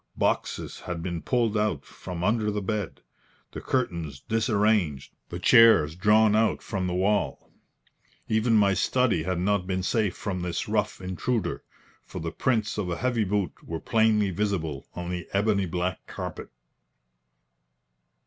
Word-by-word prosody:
Boxes - - -1
had 85 -2 -5
been 85 -2 -3
pulled 115 -4 0
out 105 -10 0
from 90 -2 -7
under 105 +2 +1
the 105 0 -1
bed, 105 -1 -3 0.5
the - - -7
curtains 85 - -2
disarranged, 105 - +1 0.2
the 85 - -5
chairs 95 -7 +6
drawn 105 +3 +4
out 110 0 +1
from 95 -3 -2
the 90 - -2
wall. 100 +3 0 0.8
Even 110 +1 +2
my 100 -2 +4
study 120 -4 +1
had 90 +2 -2
not 95 +1 0
been 95 -1 -1
safe 105 -2 0
from 95 -3 -3
this 90 -1 -3
rough - - -1
intruder, 95 +1 -2 0.4
for - - -10
the 80 0 -4
prints 110 0 0
of 95 -4 -2
a 85 - -2
heavy 125 -3 0
boot 100 -3 0
were 80 -1 -5
plainly 110 -2 +2
visible 85 -8 -2
on 90 0 -4
the 90 -2 -4
ebony 100 -1 +2
black 90 +2 -3
carpet. - - -6
100 Hz, 150 wpm, -26 LUFS, 90-110 Hz, 0.8 s, chairs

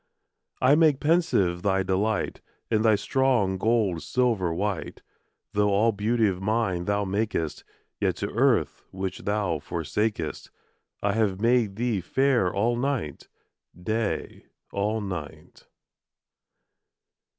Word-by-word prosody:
I 130 +2 +5
make 150 -3 +4
pensive 145 - +2
thy 95 0 +1
delight, 95 +4 -1 0.3
And 110 -1 +2
thy 110 -2 +5
strong 115 -5 +1
gold 105 -6 +1
silver 115 -9 0
white. 95 +1 -3 0.5
Though 105 0 +2
all 105 +3 +3
beauty 110 +2 +1
of 95 -2 -2
nine 100 -4 0
thou 100 +1 0
makest, 100 -5 -2 0.4
Yet - - +1
to - - -3
earth - - +2
which 95 -1 -4
thou 100 -6 -1
forsakest 85 +4 -3 0.5
I 100 0 +2
have 105 -4 0
made 115 -3 +2
thee 115 -3 -1
fair 125 -1 +2
all 115 +5 +1
night, 120 - -3 0.5
Day 110 +4 -3 0.2
all 105 +2 -1
night. 90 -7 -7
105 Hz, 115 wpm, -26 LUFS, 95-115 Hz, 0.5 s, I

